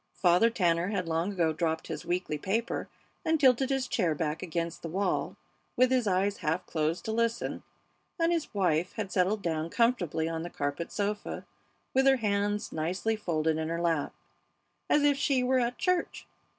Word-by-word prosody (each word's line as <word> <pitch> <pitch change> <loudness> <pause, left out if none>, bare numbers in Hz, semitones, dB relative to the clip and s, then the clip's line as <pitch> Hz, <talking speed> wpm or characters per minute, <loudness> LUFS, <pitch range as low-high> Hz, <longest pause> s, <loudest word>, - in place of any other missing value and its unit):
Father 180 +5 +4
Tanner 175 -6 +1
had 195 -4 -2
long 165 +4 0
ago 170 -5 +1
dropped 160 0 -1
his - - -6
weekly 175 -4 -1
paper 225 +8 -2 0.3
and 320 0 +2
tilted 265 -1 +4
his 270 -2 0
chair 165 -9 +1
back 150 0 -2
against 170 -1 -3
the 165 - -5
wall, 190 +3 -1 0.4
with 255 0 +4
his 250 -4 +2
eyes 195 +2 +1
half 155 +1 -1
closed 160 +2 -1
to 220 - -2
listen, 230 +1 -1 0.6
and 330 0 +3
his 335 -3 -1
wife 180 -4 +1
had 205 -4 -4
settled 195 +2 +1
down 160 -1 -1
comfortably 185 -9 +1
on 165 0 -3
the 175 - -5
carpet 145 +1 -3
sofa, 205 0 -3 0.5
with 265 +1 +4
her 270 0 +6
hands 205 -2 0
nicely 185 +8 -1
folded 160 -6 0
in 160 0 -2
her 165 0 -2
lap, 165 -4 0 0.8
as 295 - +4
if 290 -1 +4
she 275 -2 +2
were 255 +1 +3
at 245 0 -1
church. 365 -2 0
190 Hz, 175 wpm, -29 LUFS, 165-235 Hz, 0.8 s, her